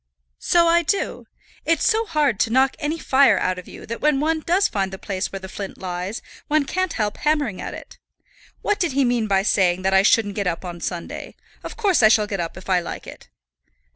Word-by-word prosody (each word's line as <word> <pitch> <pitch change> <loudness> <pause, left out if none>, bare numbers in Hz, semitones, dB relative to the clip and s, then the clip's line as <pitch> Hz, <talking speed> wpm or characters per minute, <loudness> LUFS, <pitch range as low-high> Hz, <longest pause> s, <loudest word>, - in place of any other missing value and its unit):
"So 340 -1 +3
I 340 +1 +4
do. 350 +4 -2 0.4
It's 330 -2 +1
so 450 0 +2
hard 295 - +1
to - - +2
knock 260 +3 +3
any 310 +1 -2
fire 265 -8 +4
out 185 0 -1
of 180 - -12
you, - - -11
that 230 +1 -6
when 300 -2 +2
one 315 +2 +1
does 360 +5 +2
find 195 -2 -2
the 190 - -6
place 190 0 -4
where 195 - -5
the 190 - -8
flint 195 +1 -7
lies, 185 +3 -5 0.2
one 305 -1 +2
can't 370 +4 -1
help 210 -2 -2
hammering 295 -10 0
at - - -5
it. - - -12 0.6
What 415 - 0
did 345 -7 0
he 275 0 +2
mean 240 -3 +1
by 195 -1 +2
saying 185 -3 +2
that 190 0 +1
I 190 - +6
shouldn't 205 0 +3
get 200 -2 -2
up 175 +1 -3
on 175 -1 -7
Sunday? 175 -1 -6 0.3
Of - - -8
course 400 - +2
I 215 - +8
shall 215 -1 +4
get 200 -2 -4
up 170 +1 -4
if 185 - -11
I 185 -2 +3
like 170 - -7
it." - - -12
225 Hz, 230 wpm, -22 LUFS, 190-310 Hz, 0.6 s, I